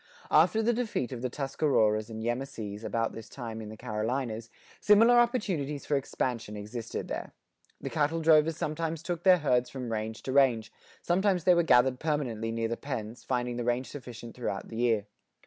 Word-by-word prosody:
After 220 0 +4
the 240 +2 +3
defeat 225 - -2
of 125 -2 -5
the 130 - -1
Tuscaroras 120 -6 +1
and 110 0 -6
Yemassees 115 -4 -4
about 115 0 -1
this 115 -1 -9
time 115 -4 -6
in 105 - -7
the 110 - -9
Carolinas, 115 +1 -3 0.3
similar 230 +4 +6
opportunities 185 - 0
for 145 - +1
expansion 120 -5 -2
existed 110 +3 -5
there. - - -5 0.5
The - - -5
cattle 160 +1 +1
drovers 160 0 +4
sometimes 160 +1 -3
took 175 -1 -3
their 185 0 +6
herds 125 -6 +1
from 125 -3 -5
range 110 +1 -4
to 130 - -3
range; 125 -5 +3 0.3
sometimes 185 0 +2
they 180 - +6
were 170 - +4
gathered 130 -5 +4
permanently 125 -8 -1
near 115 0 -1
the 115 +1 -3
pens, 120 -4 -5
finding 125 -1 -1
the 120 - -2
range 120 +2 -1
sufficient 120 -4 -9
throughout 110 -5 -4
the 110 - -7
year. 115 -4 +2
125 Hz, 180 wpm, -29 LUFS, 115-155 Hz, 0.5 s, similar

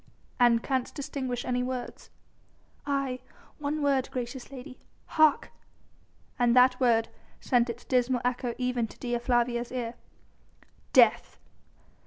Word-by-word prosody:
"And 235 -2 +4
canst 260 -2 -2
distinguish 260 -4 -4
any 250 0 0
words?" 250 -1 -5 0.8
"Aye, 275 -3 -1 0.4
one 295 +1 -2
word, 275 -2 +1
gracious 250 0 -5
lady... 255 0 -10 0.3
Hark!" 310 -2 +3 0.9
And 240 0 +3
that 250 0 +5
word 230 -3 +3 0.3
sent 245 -2 +2
its 235 +1 -7
dismal 250 -1 +1
echo 250 -1 -1
even 250 -2 -1
to - - -15
Dea 240 -1 -2
Flavia's 240 0 0
ear. 240 -2 -3 1.0
"Death!" - - +4
250 Hz, 120 wpm, -28 LUFS, 240-260 Hz, 1.0 s, that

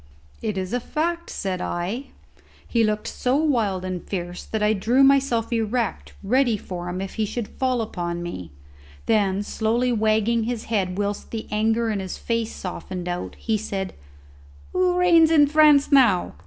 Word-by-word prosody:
"It 215 -3 -2
is 185 -1 -3
the 245 - 0
fact," 335 +6 -2
said 185 -2 -3
I. 195 +10 -3 0.6
He 230 -2 +2
looked 215 -1 0
so 255 +1 0
wild 230 -12 +1
and 185 -1 -4
fierce 175 -2 -5
that 220 -1 -2
I 210 +1 +4
drew 235 +7 +3
myself 270 -4 +3
erect 225 0 -1
ready 240 +2 +2
for 180 -2 -6
him 180 +1 -4
if 195 - -5
he - - +2
should 235 0 -4
fall 255 -3 -1
upon 175 -4 -4
me. 90 - -6 0.6
Then, 205 -2 +2
slowly 235 +4 0
wagging 220 0 +2
his 235 -1 -3
head 190 -5 -1
whilst 205 0 -2
the 225 -1 -5
anger 225 +2 +1
in 205 - -1
his 190 -1 -5
face 230 -1 -2
softened 180 -1 -6
out, 175 0 -4
he 220 -2 -1
said, 195 -3 -4 0.8
"Who 365 -1 +2
reigns 340 -3 +5
in 310 -3 +6
France 300 -1 +5
now?" 240 -10 +4
220 Hz, 170 wpm, -23 LUFS, 190-250 Hz, 0.8 s, in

